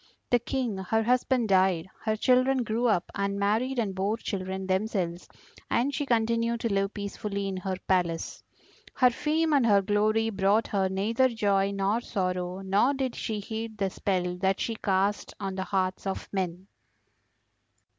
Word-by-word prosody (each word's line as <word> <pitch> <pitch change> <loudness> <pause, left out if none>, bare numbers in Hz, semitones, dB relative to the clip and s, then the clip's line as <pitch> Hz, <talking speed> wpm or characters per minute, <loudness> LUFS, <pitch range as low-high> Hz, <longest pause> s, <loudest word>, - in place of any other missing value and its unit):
The 245 - +5
King 240 -4 -2
her 225 +4 0
husband 250 -1 +2
died, 185 -3 +3 0.2
her 215 -1 +1
children 255 +3 +3
grew 230 +2 0
up 185 -6 +1
and 200 0 -1
married 220 +6 0
and 215 -5 0
bore 195 +4 -1
children 190 -3 -4
themselves, 185 -3 -1 0.4
and 260 +4 +1
she 285 +1 -2
continued 230 0 +1
to 230 -3 0
live 195 +1 0
peacefully 200 0 -4
in 190 -1 -3
her 185 0 -3
palace. 175 -3 0 0.5
Her 250 -1 +5
fame 310 +5 0
and 280 -3 +4
her 205 -4 +4
glory 215 +2 +2
brought 200 +2 +2
her 195 -2 0
neither 225 +7 +2
joy 200 -4 +1
nor 200 +3 0
sorrow, 185 -4 -2
nor 200 +8 +2
did 265 -2 -2
she 215 -2 -3
heed 220 +1 -5
the 195 -2 -1
spell 180 -3 -1
that 190 +1 +1
she 230 - -1
cast 200 -1 0
on 195 -2 -3
the 190 0 -3
hearts 190 -1 -1
of 195 - -3
men. 185 -1 -2
205 Hz, 165 wpm, -28 LUFS, 190-230 Hz, 0.5 s, The